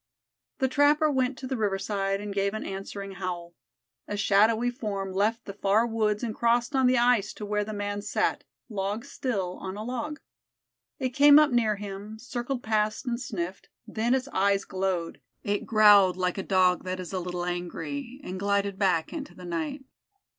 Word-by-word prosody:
The 265 Hz, -, +2 dB
trapper 295 Hz, +3 st, +3 dB
went 260 Hz, -1 st, 0 dB
to 265 Hz, -, -7 dB
the 260 Hz, -, -2 dB
riverside 195 Hz, -2 st, -1 dB
and 205 Hz, 0 st, -5 dB
gave 200 Hz, +1 st, 0 dB
an 215 Hz, -, -4 dB
answering 195 Hz, +1 st, -6 dB
howl. 175 Hz, -2 st, -4 dB, 0.5 s
A 205 Hz, -, -3 dB
shadowy 220 Hz, +4 st, +3 dB
form 200 Hz, -6 st, -4 dB
left 215 Hz, +4 st, 0 dB
the 200 Hz, -, -6 dB
far 205 Hz, +3 st, +2 dB
woods 220 Hz, -1 st, 0 dB
and 225 Hz, -2 st, -2 dB
crossed 235 Hz, +4 st, +1 dB
on 265 Hz, -1 st, +4 dB
the 255 Hz, 0 st, +4 dB
ice 240 Hz, -4 st, +3 dB
to 210 Hz, -, -7 dB
where 210 Hz, 0 st, 0 dB
the 215 Hz, -, -6 dB
man 205 Hz, -1 st, -3 dB
sat, -, -, 0 dB, 0.2 s
log 205 Hz, +1 st, -3 dB
still, 200 Hz, -10 st, -3 dB
on 190 Hz, +1 st, -6 dB
a 210 Hz, -, -5 dB
log. 255 Hz, +6 st, -4 dB, 0.8 s
It 260 Hz, -, -1 dB
came 285 Hz, +3 st, +7 dB
up 300 Hz, -2 st, +5 dB
near 225 Hz, -3 st, +2 dB
him, 205 Hz, +1 st, -7 dB
circled 245 Hz, +2 st, -4 dB
past 215 Hz, +2 st, 0 dB
and 240 Hz, -1 st, -2 dB
sniffed, 190 Hz, -6 st, -5 dB, 0.2 s
then 235 Hz, +3 st, 0 dB
its 260 Hz, 0 st, -2 dB
eye 200 Hz, +1 st, +3 dB
glowed; 185 Hz, -3 st, -2 dB, 0.2 s
it 205 Hz, 0 st, -1 dB
growled 205 Hz, -4 st, +6 dB
like 180 Hz, +1 st, -1 dB
a -, -, 0 dB
Dog 185 Hz, -2 st, +2 dB
that 185 Hz, 0 st, -4 dB
is 185 Hz, +1 st, -7 dB
a 185 Hz, -, -1 dB
little 180 Hz, 0 st, -4 dB
angry, 175 Hz, -, -4 dB
and 185 Hz, +1 st, -5 dB
glided 200 Hz, 0 st, 0 dB
back 180 Hz, -5 st, +1 dB
into 295 Hz, -3 st, -6 dB
the 180 Hz, -, -10 dB
night. 170 Hz, -, -4 dB
205 Hz, 180 wpm, -27 LUFS, 195-240 Hz, 0.8 s, came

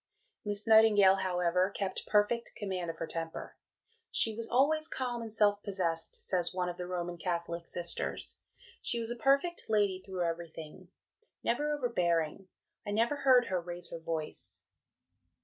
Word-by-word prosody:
Miss 205 Hz, -1 st, -1 dB
Nightingale, 215 Hz, -4 st, +7 dB
however, 180 Hz, 0 st, +1 dB
kept 195 Hz, -1 st, -4 dB
perfect 215 Hz, +3 st, +2 dB
command 185 Hz, -4 st, -3 dB
of 165 Hz, -, -5 dB
her 165 Hz, -, -3 dB
temper. 165 Hz, 0 st, -5 dB, 0.5 s
"She 225 Hz, -, +1 dB
was 230 Hz, +1 st, -4 dB
always 310 Hz, +5 st, +3 dB
calm 245 Hz, -5 st, -3 dB
and 225 Hz, -1 st, -6 dB
self 205 Hz, -1 st, +3 dB
possessed," 175 Hz, -5 st, -2 dB
says 175 Hz, -2 st, +2 dB
one 180 Hz, -1 st, -1 dB
of 175 Hz, -, -6 dB
the 180 Hz, -, -5 dB
Roman 175 Hz, -1 st, -3 dB
Catholic 170 Hz, -1 st, -3 dB
Sisters; 170 Hz, -1 st, -4 dB, 0.4 s
"she 235 Hz, -, 0 dB
was 230 Hz, 0 st, 0 dB
a -, -, -2 dB
perfect 275 Hz, +8 st, +1 dB
lady 205 Hz, -3 st, +2 dB
through 185 Hz, -2 st, -3 dB
everything 165 Hz, +1 st, -6 dB, 0.6 s
never 295 Hz, +6 st, +1 dB
overbearing. 180 Hz, -, 0 dB, 0.4 s
I -, -, -6 dB
never 230 Hz, +7 st, +1 dB
heard 260 Hz, -3 st, +5 dB
her 185 Hz, -1 st, 0 dB
raise 175 Hz, 0 st, -6 dB
her 165 Hz, -, -5 dB
voice." 160 Hz, -1 st, -4 dB
190 Hz, 150 wpm, -32 LUFS, 175-225 Hz, 0.6 s, Nightingale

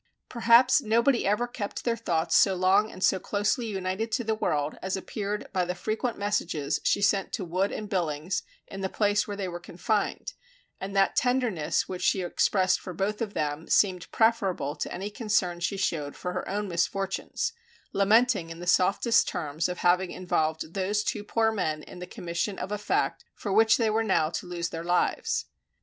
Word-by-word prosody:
Perhaps 240 Hz, +3 st, +5 dB
nobody 235 Hz, +2 st, +2 dB
ever 210 Hz, +4 st, +2 dB
kept 220 Hz, -4 st, -5 dB
their 235 Hz, -1 st, +1 dB
thoughts 170 Hz, -7 st, 0 dB
so 195 Hz, -2 st, +5 dB
long 190 Hz, +4 st, +3 dB
and 185 Hz, -, -7 dB
so 190 Hz, -, +3 dB
closely 210 Hz, +5 st, -1 dB
united 195 Hz, +2 st, -3 dB
to 240 Hz, -, +1 dB
the 220 Hz, -1 st, 0 dB
world, 150 Hz, -8 st, -1 dB
as 190 Hz, 0 st, -2 dB
appeared 205 Hz, +2 st, -4 dB
by 185 Hz, -2 st, +2 dB
the 180 Hz, +1 st, -3 dB
frequent 220 Hz, +6 st, -2 dB
messages 180 Hz, -8 st, -1 dB
she 200 Hz, -, +2 dB
sent 200 Hz, -1 st, +2 dB
to 195 Hz, -, -2 dB
Wood 185 Hz, +4 st, 0 dB
and 215 Hz, -, -5 dB
Billings 175 Hz, -3 st, -1 dB, 0.2 s
in 195 Hz, -, -8 dB
the 190 Hz, -, -1 dB
place 205 Hz, 0 st, +1 dB
where 205 Hz, -1 st, -5 dB
they 195 Hz, -2 st, -2 dB
were 175 Hz, -1 st, -5 dB
confined, 200 Hz, +5 st, -2 dB, 0.5 s
and 195 Hz, +1 st, -6 dB
that 195 Hz, 0 st, +3 dB
tenderness 245 Hz, -11 st, +1 dB
which 185 Hz, -1 st, -5 dB
she 185 Hz, +2 st, +2 dB
expressed 185 Hz, +1 st, +2 dB
for 185 Hz, -, -7 dB
both 205 Hz, +4 st, -2 dB
of 210 Hz, -3 st, -3 dB
them 150 Hz, +1 st, -2 dB
seemed 180 Hz, -4 st, +2 dB
preferable 195 Hz, -10 st, +1 dB
to -, -, -4 dB
any 195 Hz, +4 st, -4 dB
concern 205 Hz, -6 st, 0 dB
she 185 Hz, +3 st, -1 dB
showed 150 Hz, -7 st, -2 dB
for 180 Hz, -, -4 dB
her 180 Hz, -, -4 dB
own 205 Hz, +1 st, -2 dB
misfortunes, 195 Hz, -, -1 dB, 0.4 s
lamenting 205 Hz, -2 st, +3 dB
in 165 Hz, 0 st, -8 dB
the 175 Hz, -, -7 dB
softest 200 Hz, +6 st, +3 dB
terms 155 Hz, +2 st, -2 dB
of 180 Hz, -, -4 dB
having 180 Hz, +1 st, +2 dB
involved 160 Hz, -3 st, -1 dB
those 200 Hz, +2 st, 0 dB
two 210 Hz, -, -2 dB
poor 225 Hz, +1 st, +1 dB
men 155 Hz, -8 st, -2 dB
in 180 Hz, -, -11 dB
the 180 Hz, -, -7 dB
commission 175 Hz, +4 st, -3 dB
of 195 Hz, -, -5 dB
a 210 Hz, -, -2 dB
fact 205 Hz, -, 0 dB
for 200 Hz, -, -3 dB
which 220 Hz, +1 st, +5 dB
they 225 Hz, -2 st, +1 dB
were 220 Hz, +1 st, +2 dB
now 175 Hz, -7 st, +2 dB
to 180 Hz, -, -4 dB
lose 175 Hz, 0 st, -3 dB
their 165 Hz, 0 st, -5 dB
lives. 455 Hz, -, 0 dB
195 Hz, 190 wpm, -27 LUFS, 175-215 Hz, 0.5 s, Perhaps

